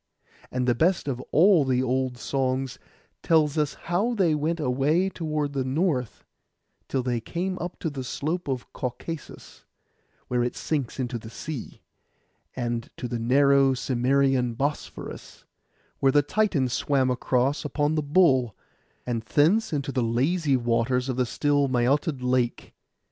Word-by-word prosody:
And 125 0 -2
the 120 - +4
best 170 +6 +1
of 130 -3 -2
all 175 -1 +5
the 130 -1 +1
old 130 0 -1
songs 130 0 -2 0.4
tells 155 -3 +3
us 150 -2 0
how 200 +8 -1
they 180 -7 +3
went 155 +3 -1
away 150 +7 +1
toward 155 -5 -3
the 135 -2 -1
North, 130 - -1 0.6
till 130 -2 -1
they 120 -2 -1
came 180 +9 -3 0.2
to - - -2
the 140 -4 -4
slope 155 +7 -3
of 130 -3 -4
Caucasus, 140 +5 -7 0.6
where 125 -1 +1
it 120 - -2
sinks 140 -5 -3
into 120 -2 -2
the 110 - -10
sea; 145 +2 -7 0.7
and 120 -2 -3
to 125 - -4
the 120 -1 -3
narrow 135 +2 +4
Cimmerian 130 -1 +1
Bosphorus, 145 +4 -5 0.2
{130b} - - -40
where 135 - +4
the 145 +1 +4
Titan 160 -5 +1
swam 130 +1 +1
across 130 +3 0
upon 150 0 0
the 155 - +1
bull; 140 - +3 0.5
and 120 -2 -2
thence 160 - +2
into 145 -2 -2
the 130 - 0
lazy 135 +6 +1
waters 120 +2 0
of 130 - -1
the 125 -1 0
still 145 +1 +1
Mæotid 130 +3 +1
lake. 125 -1 0
135 Hz, 150 wpm, -26 LUFS, 125-155 Hz, 0.7 s, all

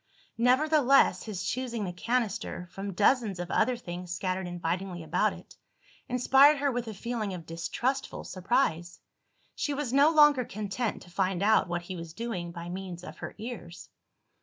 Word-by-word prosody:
Nevertheless, 275 -3 +4
his 200 -4 -4
choosing 240 -3 -2
the 180 - -4
canister, 225 -2 -2
from 195 +1 -5
dozens 210 -1 +3
of 175 0 -4
other 250 +1 +2
things 180 -5 -7
scattered 185 0 -2
invitingly 175 +1 -3
about 160 +3 +1
it, - - -12 0.5
inspired 270 +4 +6
her 280 0 +1
with 245 -1 -3
a 220 - -5
feeling 220 -2 -3
of 170 -2 -9
distrustful 245 +12 -2
surprise. 175 -4 -1 0.5
She 290 -4 -2
was 275 -4 -3
no 280 +3 +6
longer 295 -4 +6
content 215 +1 -3
to 175 - -16
find 190 0 0
out 215 -1 +4
what 175 0 -3
he 185 +1 -6
was 165 -2 -8
doing 190 -6 -4
by 170 0 -7
means 180 -1 -6
of - - -10
her - - -7
ears. 210 -7 -8
200 Hz, 160 wpm, -29 LUFS, 175-250 Hz, 0.5 s, inspired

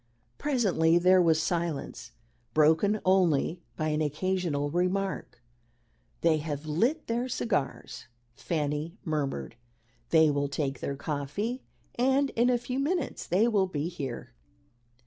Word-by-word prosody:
Presently 195 - +2
there 185 +1 +5
was 165 -2 +3
silence, 165 -2 -3 0.4
broken 160 +8 +4
only 175 -3 +2
by 155 -1 -1
an 150 0 0
occasional 150 -1 -1
remark. 180 -6 -2 0.8
"They 165 -2 +4
have 150 -1 -4
lit 235 - 0
their 240 +2 -2
cigars," 145 - -3 0.3
Fanny 150 +4 -3
murmured; 140 - -3 0.5
"they 160 -2 +5
will 140 0 0
take 140 -1 -3
their 140 - -3
coffee, 155 - -3 0.3
and 265 +3 +2
in 240 +2 +2
a 250 - +3
few 250 +2 -4
minutes 310 +1 -2
they 200 +6 +3
will 205 -5 +2
be 160 -2 -3
here." 135 - -6
170 Hz, 125 wpm, -28 LUFS, 150-210 Hz, 0.8 s, there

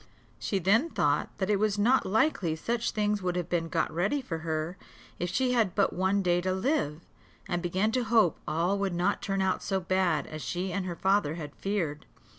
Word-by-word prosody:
She 200 - -1
then 210 - +3
thought - - +1
that 195 0 0
it 200 - +2
was 210 -1 +1
not 240 +6 +3
likely 195 - +1
such 230 +8 -1
things 210 -1 0
would 180 -1 -1
have 180 -2 -2
been 165 -2 0
got - - 0
ready 195 - +1
for 170 -11 -5
her, 160 +1 -3 0.4
if 175 - -1
she 250 +7 +1
had 225 -7 +1
but 200 - +2
one 190 +2 +1
day 175 -1 +2
to 185 +1 0
live; 190 - 0 0.5
and 175 0 -1
began 185 +5 0
to 250 0 0
hope 220 -7 +3
all 170 +6 +1
would 195 -3 -1
not 180 +4 +1
turn 195 -1 -1
out 190 -1 0
so 195 -1 -1
bad 185 0 +1
as 155 0 -7
she 180 +4 -3
and 195 -2 -2
her 175 - -3
father 190 -4 +1
had 150 -4 -7
feared. 170 -7 -2
190 Hz, 210 wpm, -29 LUFS, 175-210 Hz, 0.5 s, then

